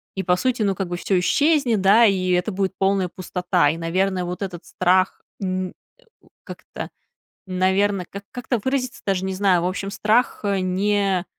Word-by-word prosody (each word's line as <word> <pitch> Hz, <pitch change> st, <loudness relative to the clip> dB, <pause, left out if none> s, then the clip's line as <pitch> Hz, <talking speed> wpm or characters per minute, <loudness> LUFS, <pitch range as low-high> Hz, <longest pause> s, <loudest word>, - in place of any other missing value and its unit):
И, 190 Hz, -, -2 dB
по 180 Hz, +1 st, +3 dB
сути, 245 Hz, +3 st, 0 dB
ну, 195 Hz, -2 st, +2 dB
как 190 Hz, -1 st, -3 dB
бы 175 Hz, 0 st, -4 dB
всё 185 Hz, +1 st, +1 dB
исчезнет, 275 Hz, -, +2 dB
да, 205 Hz, +5 st, +6 dB
и 185 Hz, -3 st, +2 dB
это 180 Hz, +4 st, +1 dB
будет 190 Hz, 0 st, -1 dB
полная 195 Hz, -1 st, +1 dB
пустота. 180 Hz, -3 st, 0 dB
И, 160 Hz, -, -2 dB
наверное, 180 Hz, +2 st, 0 dB
вот 180 Hz, +2 st, -5 dB
этот 185 Hz, -3 st, -5 dB
страх, 185 Hz, +1 st, +1 dB, 0.2 s
н 185 Hz, -1 st, -2 dB
э, -, -, -13 dB, 0.7 s
как-то, -, -, -8 dB, 0.6 s
наверное, 190 Hz, +1 st, +1 dB
как 200 Hz, +1 st, -8 dB
как-то 245 Hz, -1 st, -2 dB
выразиться, 260 Hz, -1 st, -2 dB
даже 190 Hz, -1 st, 0 dB
не 190 Hz, -, -2 dB
знаю, 185 Hz, -3 st, +3 dB
в -, -, 0 dB
общем, 195 Hz, +1 st, -3 dB
страх, 220 Hz, +4 st, +1 dB
э, 200 Hz, -2 st, 0 dB
не, 195 Hz, 0 st, 0 dB
190 Hz, 180 wpm, -22 LUFS, 185-205 Hz, 0.7 s, да